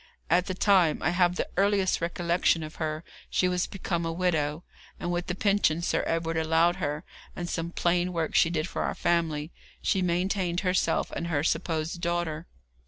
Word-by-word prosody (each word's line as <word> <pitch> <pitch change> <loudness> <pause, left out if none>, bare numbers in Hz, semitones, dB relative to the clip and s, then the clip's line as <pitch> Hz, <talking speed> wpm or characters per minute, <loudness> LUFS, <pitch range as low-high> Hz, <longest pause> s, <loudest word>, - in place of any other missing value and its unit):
At 180 +2 +3
the 185 - -2
time 185 -5 +4
I 165 - +2
have 175 0 +2
the - - -1
earliest 195 -2 +2
recollection 170 -1 +1
of 155 0 -9
her 155 0 -3 0.3
she 180 - +2
was 180 -1 0
become 175 -3 -3
a 165 - -1
widow, 165 -3 0 0.4
and 175 - -2
with 175 0 -2
the 180 - -2
pension 195 -5 +2
Sir - - +1
Edward 165 0 -1
allowed 160 +2 +3
her, 150 -3 -2 0.3
and 175 - -4
some 165 0 -3
plain 175 +1 +1
work 165 -2 -2
she 165 - +5
did 160 -2 -1
for - - -4
our - - -1
family, 160 -2 0 0.3
she 195 - +1
maintained 180 0 0
herself 185 -1 +1
and 170 - -3
her 150 -4 0
supposed 165 +1 -1
daughter. 170 -1 -2
170 Hz, 180 wpm, -28 LUFS, 160-180 Hz, 0.4 s, she